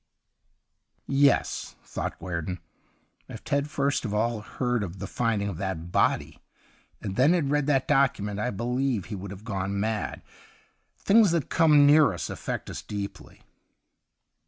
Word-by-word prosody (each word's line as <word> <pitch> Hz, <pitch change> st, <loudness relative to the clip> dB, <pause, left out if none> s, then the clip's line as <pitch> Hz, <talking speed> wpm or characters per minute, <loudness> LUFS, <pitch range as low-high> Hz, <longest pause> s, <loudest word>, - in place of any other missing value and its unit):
' -, -, -48 dB, 0.2 s
Yes/ -, -, -1 dB
thought -, -, -5 dB
Guerdon, 90 Hz, 0 st, -4 dB, 0.4 s
' -, -, -41 dB
if -, -, -9 dB
Ted 140 Hz, 0 st, 0 dB
had -, -, -11 dB
first 140 Hz, -1 st, 0 dB
of 105 Hz, -3 st, -3 dB
all 115 Hz, +1 st, 0 dB
heard 120 Hz, +2 st, -2 dB
of 95 Hz, -2 st, -5 dB
the 95 Hz, -, -5 dB
finding 110 Hz, -2 st, -1 dB
of 100 Hz, -5 st, -4 dB
that 85 Hz, -3 st, -4 dB
body, -, -, +1 dB, 0.6 s
and 95 Hz, -2 st, -4 dB
then 140 Hz, +7 st, +5 dB
had 155 Hz, -6 st, +1 dB
read 150 Hz, -1 st, +1 dB
that 135 Hz, -3 st, +2 dB
document, 115 Hz, -8 st, +1 dB
I 125 Hz, -, 0 dB
believe 125 Hz, 0 st, -1 dB
that -, -, -13 dB
he 105 Hz, -, -4 dB
would 100 Hz, +1 st, -7 dB
have 100 Hz, +2 st, -9 dB
gone 100 Hz, -2 st, -3 dB
mad. 110 Hz, +1 st, -2 dB, 0.7 s
Things 210 Hz, 0 st, +5 dB
that 165 Hz, -4 st, 0 dB
come 150 Hz, -3 st, +6 dB
near 145 Hz, -5 st, +6 dB
us 85 Hz, -, -5 dB
affect -, -, -5 dB
us -, -, -6 dB
deeply.' 100 Hz, -2 st, -7 dB
115 Hz, 165 wpm, -27 LUFS, 100-140 Hz, 0.7 s, come